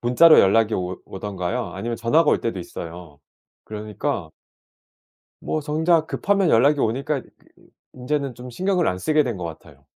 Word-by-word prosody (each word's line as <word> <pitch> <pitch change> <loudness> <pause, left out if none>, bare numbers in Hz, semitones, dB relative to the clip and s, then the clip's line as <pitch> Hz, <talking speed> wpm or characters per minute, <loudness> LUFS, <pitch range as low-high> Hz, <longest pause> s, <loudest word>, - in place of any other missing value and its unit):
문자로 155 +7 +6
연락이 110 +3 +3
오 90 0 -3
오든가요. 95 +4 -4
아니면 115 0 -4
전화가 145 +8 +3
올 - - +2
때도 115 -5 -3
있어요. 85 -3 -9 0.4
그러니까 105 - -4 1.1
뭐 155 - -2
정작 160 +2 +1
급하면 200 -4 +1
연락이 140 +6 +4
오니까 135 +4 -1
그 - - -21 0.6
인제는 135 +1 -3
좀 125 +1 -9
신경을 180 +5 0
안 90 - 0
쓰게 150 +7 +2
된 120 -6 -3
것 90 - -6
같아요. 80 -1 -11
120 Hz, 330 characters per minute, -22 LUFS, 95-150 Hz, 1.1 s, 문자로